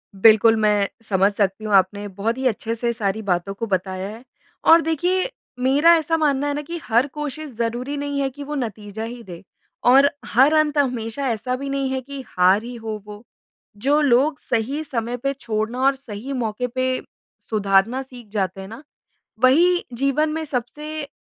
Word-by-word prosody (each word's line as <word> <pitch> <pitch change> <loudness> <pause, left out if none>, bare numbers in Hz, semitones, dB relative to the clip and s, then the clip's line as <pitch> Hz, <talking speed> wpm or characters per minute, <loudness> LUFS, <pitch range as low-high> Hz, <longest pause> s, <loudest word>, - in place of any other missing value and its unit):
बिल्कुल 220 +2 +6
मैं 210 -2 +2 0.2
समझ 195 -2 +2
सकती 200 0 -1
हूँ 210 - -2
आपने 200 +2 +2
बहुत 205 +5 -2
ही 265 - -3
अच्छे 225 -1 -2
से 235 +1 -1
सारी 215 -2 -2
बातों 195 -1 -1
को 215 +4 -4
बताया 190 -1 -2
है। 225 +3 -10 0.4
और 330 +1 +8
देखिए 355 - 0 0.3
मेरा 280 +6 +5
ऐसा 325 0 +1
मानना 290 -2 +1
है 290 - 0
ना 295 - -3
कि 335 +4 -6
हर 235 +4 +2
कोशिश 295 +1 -6
ज़रूरी 240 +5 -2
नहीं 285 0 -2
है 270 - 0
कि 285 +2 -9
वो 295 +1 -5
नतीजा 220 -4 -5
ही 235 +1 -7
दे 175 -4 -10 0.5
और 275 +3 +7 0.2
हर 265 +7 +4
अंत 310 -1 +2
हमेशा 250 -1 -1
ऐसा 245 +3 -2
भी 275 +2 -5
नहीं 275 -1 -1
है 265 0 -2
कि 275 +1 -8
हार 185 +4 +3
ही 245 +1 -7
हो 220 -2 -6
वो। 210 +1 -10 0.5
जो 280 +8 +2
लोग 285 +2 +3
सही 255 +6 -1
समय 245 -4 -3
पर 275 +3 -1
छोड़ना 220 +3 -2
और 275 0 +4
सही 260 0 -7
मौके 245 -1 -2
पर 255 0 0 0.5
सुधारना 210 +4 +2
सीख 250 -4 -12
जाते 195 -2 -2
हैं 190 - -8
ना, 225 +7 -10 0.6
वही 345 +8 +4
जीवन 275 +5 +1
में 320 +1 -3
सबसे 295 +3 -4
245 Hz, 185 wpm, -22 LUFS, 215-280 Hz, 0.6 s, और